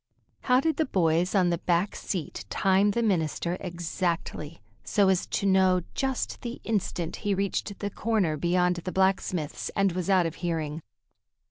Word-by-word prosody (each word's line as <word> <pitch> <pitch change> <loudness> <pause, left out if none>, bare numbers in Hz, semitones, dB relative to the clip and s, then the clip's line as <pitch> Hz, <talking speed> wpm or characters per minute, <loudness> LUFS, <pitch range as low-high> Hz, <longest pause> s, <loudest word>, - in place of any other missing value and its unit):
How 250 0 +4
did 320 +3 0
the 315 - +2
boys 175 -3 +1
on 180 -3 +4
the 170 - 0
back 175 +2 +1
seat 175 -7 -4
time 195 +1 +3
the 235 +3 0
minister 175 -3 0
exactly, 170 -3 -3 0.2
so 200 -2 +3
as 185 -2 +1
to - - -2
know 190 -1 +4
just 265 -2 -2
the 240 0 -5
instant 180 -6 -2
he 205 -2 -1
reached 200 +1 -2
the 205 0 -4
corner 210 -9 0
beyond 180 +3 +1
the 180 +2 -4
blacksmith's 185 -5 0
and 195 -1 +3
was 180 +2 -3
out 185 -3 +4
of 165 0 -4
hearing? 160 -3 -2
185 Hz, 160 wpm, -27 LUFS, 170-200 Hz, 0.2 s, How